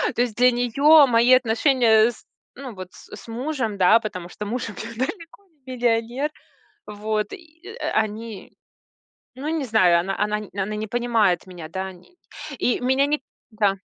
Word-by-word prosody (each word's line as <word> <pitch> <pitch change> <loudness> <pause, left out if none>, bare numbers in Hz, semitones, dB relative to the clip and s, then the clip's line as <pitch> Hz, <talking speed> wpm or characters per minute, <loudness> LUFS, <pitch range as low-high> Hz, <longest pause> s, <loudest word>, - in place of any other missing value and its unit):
То 240 - +1
есть 235 -3 -1
для 250 +1 +5
неё 275 +5 +5
мои 240 +1 +4
отношения 235 -2 +4
с 235 - -18 0.3
ну 255 -4 -9
вот 185 -1 -8
с - - -13
с - - -14
мужем, 235 -3 -3
да, 190 +5 +6
потому 185 -6 -7
что 210 - -7
муж 235 +1 -3
у - - -8
меня 230 +3 -8
далеко 330 - -5 0.2
не 260 -1 -7
миллионер. 240 +4 0 0.6
Вот, 210 0 -3
и, 335 -1 -13
а, - - -3
э, - - -1
они, 215 -1 -8 0.8
ну 285 +4 -5
не 320 -4 -2
знаю, 185 -7 +4
она 195 +2 -3
она 210 0 0 0.2
она 200 +2 -3
не 215 +1 -4
понимает 225 -7 +1
меня, 175 -4 -9
да. 190 +2 -5
И - - -14 0.6
не 245 - +1
и - - -10
меня 265 +2 +2
ни 295 0 -1 0.3
да. 205 -3 +1
230 Hz, 180 wpm, -23 LUFS, 210-255 Hz, 0.8 s, да